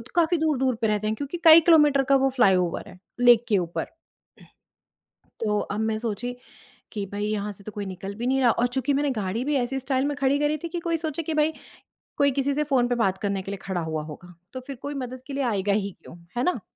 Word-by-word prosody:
काफ़ी 340 0 +3
दूर-दूर 265 -5 +1
पे 220 - +2
रहते 215 0 0
हैं 215 - 0
क्योंकि 285 +7 -5
कई 325 0 +9
किलोमीटर 300 -5 +5
का 275 - +6
वो 270 - +4
फ्लाईओवर 185 -7 +2
है, 180 - -14 0.2
लेक 240 -1 +6
के 205 - +4
ऊपर। 170 -2 -2 1.6
तो 210 -2 0
अब 205 +2 -4
मैं 220 0 0
सोची 235 +2 -4 0.6
कि 205 -2 -4
भई 205 +1 -3
यहाँ 210 -1 -2
से 200 - -14
तो 215 - -7
कोई 205 0 -5
निकल 195 +1 -7
भी 240 +3 -3
नहीं 265 +1 +2
रहा 240 -2 +5
और 245 +2 +1
चूँकि 265 +3 -1
मैंने 285 +1 +1
गाड़ी 215 +1 -2
भी 295 -1 0
ऐसी 260 +2 -1
स्टाइल 265 +1 0
में 290 0 -1
खड़ी 280 +1 +2
करी 295 +1 +1
थी - - -2
कि 345 0 -4
कोई 335 -1 -1
सोचे 315 0 -3
कि 320 - -3
भई 305 +1 +2 0.6
कोई 280 -1 +3
किसी 275 +1 0
से 300 +2 0
फ़ोन 260 -4 +2
पे 245 - 0
बात 195 -5 +1
करने 200 -2 -1
के 195 - -7
लिए 200 - -4
खड़ा 185 -3 -2
हुआ 160 -1 -3
होगा। 175 +4 -11 0.2
तो 255 - -5
फिर 275 - -5
कोई 285 +1 -5
मदद 255 -1 -6
के 280 - -6
लिए 275 0 -1
आएगा 205 -4 0
ही 200 -1 -1
क्यों? 175 - -12 0.2
है 245 - +1
ना? 360 - 0
245 Hz, 245 wpm, -25 LUFS, 205-285 Hz, 1.6 s, कई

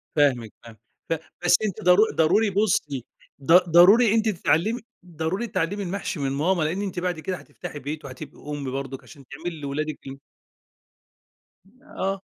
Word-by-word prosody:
فاهمِك 130 -7 +2
فاهمِك. 115 -2 -14 0.3
ف - - +2 0.3
بس 175 - +6
أنتِ 200 -5 -4
ضرو 180 +4 +6
ضروري 195 +7 +3
بُصّي، 190 - 0 0.4
ض 160 - -1 0.2
ضروري 200 +7 +7
أنتِ 220 0 +2
تتعلمي 210 +4 +1 0.2
ضروري 175 +6 -3
تتعلمي 200 +1 -2
المحشي 190 -2 -4
من 135 -1 -1
ماما، 160 +5 +1
لأن 165 +6 -1
أنتِ 190 -3 -3
بعد 180 -2 -2
كده 185 +3 -3
هتفتحي 165 -4 -9
بيت 150 +2 -6
وهتبقي 135 +2 -9
أُم 140 -3 -4
برضك 135 0 -5
عشان 140 -2 -15
تعملي 160 +2 -7
لولادِك 150 +2 -3
ال 135 0 -7 1.7
آه. 195 -9 -3
165 Hz, 150 wpm, -24 LUFS, 145-195 Hz, 1.7 s, ضروري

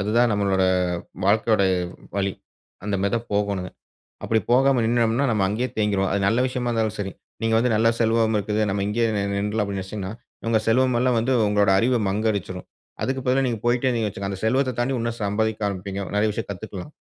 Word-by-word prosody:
அதுதான் 115 +4 +2
நம்மளோட 100 -2 +1 0.6
வாழ்க்கையோட 110 +1 +3 0.6
வழி. 100 -1 0 0.5
அந்தமாரி 100 -1 -1
தான் 115 0 -4
போகணுங்க. 100 -3 -1 0.6
அப்பிடி 110 0 +2
போகாம 135 0 +4
நின்னம்ன்னா, 115 +3 +2
நம்ம 105 -3 +1
அங்கேயே 115 +6 -1
தேங்கிருவோம். 100 -2 +1
அது 100 - +1
நல்ல 115 +4 +1
விஷயமா 125 -1 -3
இருந்தாலும் 110 -2 -1
சரி. 95 -2 -4 0.3
நீங்க 115 0 +2
வந்து 125 +2 +2
நல்ல 115 +1 +3
செல்வம் 115 -1 +2
இருக்குது. 105 +1 -1
நம்ம 100 0 -1
இங்கேயே 115 +3 +1
நின் 100 0 -1
நின்றுலாம் 105 +1 0
அப்பிடின்னு 100 -1 -4
நினச்சீங்கன்னா, 95 0 -5 0.4
உங்க 115 -1 +3
செல்வம் 125 +2 +3
எல்லாம் 125 0 +2
வந்து 125 +4 0
உங்களோட 105 -1 +3
அறிவ 125 +5 +2
மங்கடிச்சுரும். 100 -3 -2 0.4
அதுக்கு 130 0 -1
பதிலா 130 +2 +3
நீங்க 120 -3 -1
போயிட்டே 120 +1 +1
இருந்தீங்கன்னு 115 -4 +1
வச்சுக்குங்க, 100 0 -5
அந்த - - -7
செல்வத்த 130 +3 +2
தாண்டி 125 +3 0
இன்னும் 115 0 -2
சம்பாதிக்க 110 +1 -1
ஆரம்பிப்பீங்க. 100 0 -4
நெறைய 105 +1 +2
விஷயம் 110 +2 -5
கத்துக்கலாம். 95 +4 -7
110 Hz, 180 wpm, -23 LUFS, 100-120 Hz, 0.6 s, போகாம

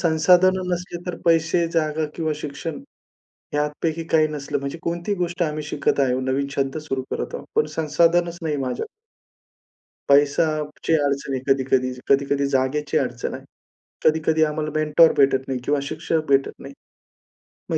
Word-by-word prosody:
संसाधनं 180 +3 +3
नसले 175 0 -4
तर 180 - -3
पैसे, 165 +1 +3
जागा 155 -1 0
किंवा 160 -2 -1
शिक्षण 150 - -6 0.7
ह्यापैकी 150 +2 -1
काही 155 -1 +5
नसलं 150 -2 -3
म्हणजे, 140 +4 -5
कोणतीही 170 +4 -2
गोष्ट 175 0 -2
आम्ही 155 -1 -2
शिकत 145 -1 -1
आहोत 130 -1 +1
नवीन 140 +1 0
छंद 135 +1 -1
सुरू 135 -1 -2
करत - - -4
आहोत. - - -6
पण 450 - +3
संसाधनच 170 +2 +2
नाही 150 -2 -1
माझ्या 125 -1 -3 1.2
पैशाची 150 +2 +2
अडचण 140 -2 0
आहे 130 - -2
कधी-कधी. 130 -1 0 0.2
कधी-कधी 140 0 +2
जागेची 135 +2 0
अडचण - - -3
आहे. - - -8 0.6
कधी-कधी 160 0 +3
आम्हाला 155 0 -1
मेंटर 155 +2 +5
भेटत 135 -1 +4
नाही 130 -2 -2
किंवा 145 -1 +1
शिक्षक 155 +2 -2
भेटत 135 0 +3
नाही. 140 0 -10 1.0
मग - - +1
155 Hz, 145 wpm, -22 LUFS, 140-165 Hz, 1.2 s, काही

